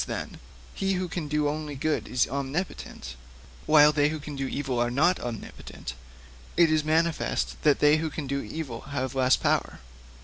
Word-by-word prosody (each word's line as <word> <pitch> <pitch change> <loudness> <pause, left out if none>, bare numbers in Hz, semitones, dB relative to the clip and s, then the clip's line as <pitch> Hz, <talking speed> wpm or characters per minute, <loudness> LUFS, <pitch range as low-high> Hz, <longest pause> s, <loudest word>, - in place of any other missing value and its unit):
'Since, - - -4
then, - - -5 0.3
he 195 0 0
who 185 -1 -1
can 170 -3 -4
do 150 0 +1
only 150 0 -3
good 155 +3 -1
is 125 - +1
omnipotent, 135 - -4 0.5
while 150 -1 +7
they 145 -1 +2
who 155 - -3
can 145 0 -7
do 135 -1 -2
evil 135 -2 -2
also 120 0 +2
are - - -2
not 155 +9 +3
omnipotent, 115 - -7 0.6
it 170 -2 +5
is 155 -1 +2
manifest 160 +1 0
that 150 -2 +4
they 150 +1 +6
who 160 0 -2
can 150 -1 -5
do 140 +1 -2
evil 140 -8 -6 0.2
have 130 -1 -1
less 130 -1 +4
power. - - 0
150 Hz, 190 wpm, -27 LUFS, 135-155 Hz, 0.6 s, while